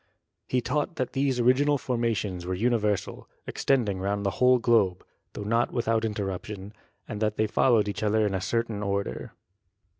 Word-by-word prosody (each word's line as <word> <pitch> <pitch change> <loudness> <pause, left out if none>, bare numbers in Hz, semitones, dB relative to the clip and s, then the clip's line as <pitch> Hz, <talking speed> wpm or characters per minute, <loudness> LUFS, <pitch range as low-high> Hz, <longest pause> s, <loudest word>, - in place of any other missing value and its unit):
He 125 - +1
taught 145 +6 -1
that 130 - -3
these 135 -2 0
original 135 +4 +3
formations 115 -8 -2
were 95 - -1
uni 120 +4 +2
versal, 105 -2 -2 0.2
extending 110 -8 0
round 100 +1 -2
the 100 - +1
whole 125 0 +6
globe, 115 -7 +2 0.3
tho - - -6
not 115 +3 +1
without 115 -2 0
interruption, 100 -1 -4 0.3
and 105 -2 -6
that 110 -1 0
they 110 - +2
followed 110 0 +3
each 100 -2 -4
other 110 0 +2
in 100 - -1
a 95 - -1
cer 115 +4 0
tain 110 -3 -6
order. 100 -1 -3
110 Hz, 175 wpm, -27 LUFS, 100-120 Hz, 0.3 s, whole